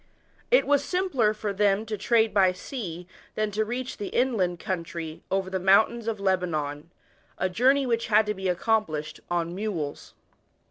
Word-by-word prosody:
It - - +5
was 285 0 +3
simpler 295 - +1
for 210 -1 -3
them 205 +1 +2
to 220 -1 -3
trade 225 +2 +2
by 190 -3 +4
sea 180 -4 -6 0.3
than 215 -1 -1
to 215 +2 0
reach 245 +4 -4
thu 205 - -4
inland 205 -9 +1
country 170 -3 -5
over 190 0 0
the 190 0 -2
mountains 215 +5 +3
of 220 -2 -2
Lebanon 165 -6 -1 0.5
a 185 - +1
journey 265 +8 +3
which 230 -2 0
had 215 0 +4
to 210 - -1
be 190 -2 -3
accomplished 180 -5 -1
on 170 -1 -1
mules. 180 -7 -4
205 Hz, 165 wpm, -26 LUFS, 180-225 Hz, 0.5 s, It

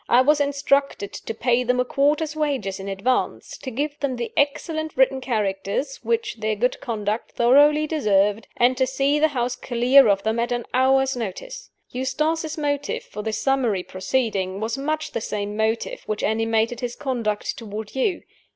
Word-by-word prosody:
I 245 - +6
was 290 +2 +3
instructed 280 -6 0
to - - -5
pay 245 +1 +2
them 250 +1 +1
a 250 - +2
quarter's 295 +4 +1
wages 275 -11 -1
in 195 - -7
advance, 200 +6 -1
to 260 - -6
give 285 +4 -3
them 275 -3 -1
the 240 -1 -4
excellent 315 +2 -1
written 265 0 +3
characters 215 +2 -2
which 460 - -2
their 215 0 -1
good 245 +5 0
conduct 215 -1 -3
thoroughly 290 +5 +5
deserved, 210 -8 +1
and 245 +2 +4
to 260 0 +2
see 275 +3 +1
the 315 - +5
house 250 -4 -2
clear 250 +2 +4
of 195 -1 +2
them 220 +1 0
at 240 +1 -1
an 240 -1 -1
hour's 265 +1 +3
notice. 375 - -6 0.2
Eustace's 310 +5 -1
motive 285 -1 -2
for 210 - -7
this 220 0 -2
summary 245 -9 +1
proceeding 190 -1 -1
was 225 +2 -2
much 310 +3 -2
the - - -3
same 205 -1 -3
motive 225 - -1
which 215 - -2
animated 225 +2 +1
his 245 -1 -4
conduct 235 -7 -2
toward 215 -1 -7
you. 330 +7 0
250 Hz, 170 wpm, -23 LUFS, 220-285 Hz, 0.2 s, I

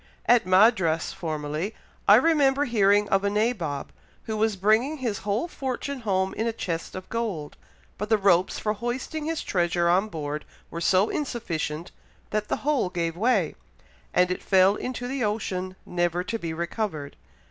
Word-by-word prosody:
At 240 -6 +4
Madras, 185 -4 +4
formerly, 155 +4 -3 0.3
I 205 - +9
remember 285 0 +4
hearing 205 -3 +3
of 195 0 +2
a 200 - +2
nabob 200 - -1 0.3
who 220 - -4
was 215 0 +1
bringing 220 +10 +2
his 235 -7 -2
whole 210 - -1
fortune 270 -2 -4
home 190 -4 0
in 225 - -1
a - - +1
chest 170 -6 -4
of 185 0 -7
gold, 205 -11 -3 0.4
but 210 +1 -3
the 220 - +5
ropes 190 -3 +3
for 210 - -1
hoisting 245 +7 -4
his 325 0 -2
treasure 175 -1 +1
on 190 +5 +3
board 150 -3 -4 0.3
were 170 - -5
so 190 +4 +3
insufficient, 170 - -3 0.4
that 210 0 -1
the - - 0
whole 290 -10 +2
gave 170 -2 -2
way, 210 -4 +2 0.6
and 180 0 +3
it 180 - -2
fell 190 0 +5
into 250 +1 -4
the 265 0 -2
ocean, 185 -3 -2
never 175 0 0
to 230 +4 -3
be 165 -4 -4
recovered. 165 -3 -3
200 Hz, 165 wpm, -26 LUFS, 175-235 Hz, 0.6 s, I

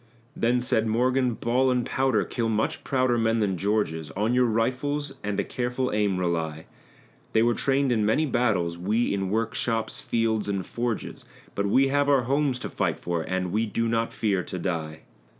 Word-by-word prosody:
Then 120 +2 +1
said 115 -2 +1
Morgan, 125 +2 +1
"Ball 125 +4 +1
and 125 -2 +1
powder 130 -7 +1
kill 115 +3 -2
much 110 0 -1
prouder 130 -3 +1
men 115 0 +2
than 100 -3 +1
George's; 90 -5 -1
On 110 +4 +1
your 125 0 +4
rifles 130 +6 -1
and 105 -1 -2
a - - +2
careful 125 0 -2
aim 105 -3 +1
rely. 80 -3 -2 0.7
They 110 - +4
were 120 0 +3
trained 135 +2 +1
in 110 -3 +2
many 110 +9 +2
battles 95 - 0
we 105 +7 +1
in 95 -1 -1
workshops, 115 +1 -1
fields, 110 -2 0
and 100 -2 -2
forges; 120 -2 -4 0.3
But 100 0 -1
we 135 +6 +4
have 145 +1 +2
our 135 -3 +4
homes 135 +1 +1
to - - -4
fight - - -1
for, 85 -1 -2
and 90 +1 -2
we 110 +3 +1
do 115 +2 -1
not 115 0 0
fear 100 -4 0
to 90 - -6
die." 80 -4 -3
115 Hz, 185 wpm, -26 LUFS, 100-125 Hz, 0.7 s, your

